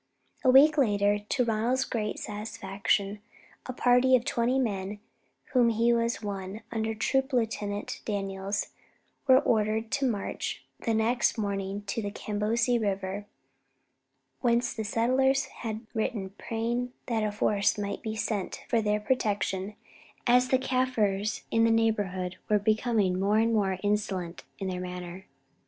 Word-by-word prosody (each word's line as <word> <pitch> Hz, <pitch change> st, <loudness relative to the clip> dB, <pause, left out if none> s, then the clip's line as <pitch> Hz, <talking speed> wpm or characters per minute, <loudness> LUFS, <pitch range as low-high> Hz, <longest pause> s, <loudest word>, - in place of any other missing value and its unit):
A 260 Hz, -, +4 dB
week 290 Hz, +4 st, +7 dB
later, 205 Hz, -4 st, +3 dB
to 240 Hz, +5 st, 0 dB
Ronald's 235 Hz, +4 st, +1 dB
great 215 Hz, -3 st, -2 dB
satisfaction, 205 Hz, -1 st, -2 dB, 0.5 s
a -, -, -2 dB
party 250 Hz, +1 st, +4 dB
of 245 Hz, -, +1 dB
twenty 240 Hz, +2 st, +1 dB
men, 200 Hz, -6 st, -1 dB
of -, -, -10 dB, 0.6 s
whom 245 Hz, -3 st, +5 dB
he 230 Hz, +1 st, +3 dB
was 235 Hz, 0 st, 0 dB
one, 200 Hz, +1 st, -5 dB
under 220 Hz, -1 st, -1 dB
Troop 265 Hz, +5 st, 0 dB
Lieutenant 210 Hz, -4 st, -2 dB
Daniels, 195 Hz, -1 st, -2 dB, 0.6 s
were 260 Hz, -1 st, +8 dB
ordered 220 Hz, -1 st, +1 dB
to 270 Hz, -1 st, +1 dB
march 205 Hz, -4 st, -4 dB
the 230 Hz, -, 0 dB
next 235 Hz, +3 st, +2 dB
morning 200 Hz, -1 st, -2 dB
to 205 Hz, +3 st, -3 dB
the 205 Hz, -, -3 dB
Kabousie 220 Hz, +4 st, 0 dB
River, 195 Hz, 0 st, -2 dB, 1.1 s
whence 240 Hz, 0 st, +1 dB
the 220 Hz, -, -4 dB
settlers 260 Hz, +5 st, +2 dB, 0.2 s
had 220 Hz, -1 st, -4 dB
written 215 Hz, -4 st, -2 dB
praying 235 Hz, +4 st, -3 dB
that 230 Hz, -3 st, 0 dB
a 215 Hz, -1 st, 0 dB
force 205 Hz, 0 st, +1 dB
might 200 Hz, -1 st, -3 dB
be 220 Hz, -1 st, -4 dB
sent 215 Hz, -3 st, -3 dB
for 230 Hz, -, +2 dB
their 210 Hz, 0 st, +1 dB
protection, 210 Hz, -3 st, -1 dB, 0.5 s
as 250 Hz, +1 st, +5 dB
the 260 Hz, -, +3 dB
Kaffirs 235 Hz, -6 st, 0 dB
in 225 Hz, -, +3 dB
the 230 Hz, -, +5 dB
neighbourhood 205 Hz, -5 st, 0 dB
were 210 Hz, -, +5 dB
becoming 215 Hz, -3 st, +1 dB
more 200 Hz, +2 st, +2 dB
and 225 Hz, +1 st, +3 dB
more 195 Hz, -4 st, +1 dB
insolent 200 Hz, -4 st, -1 dB
in 195 Hz, -, -4 dB
their 180 Hz, -1 st, -3 dB
manner. 180 Hz, +1 st, -7 dB
215 Hz, 145 wpm, -28 LUFS, 200-235 Hz, 1.1 s, were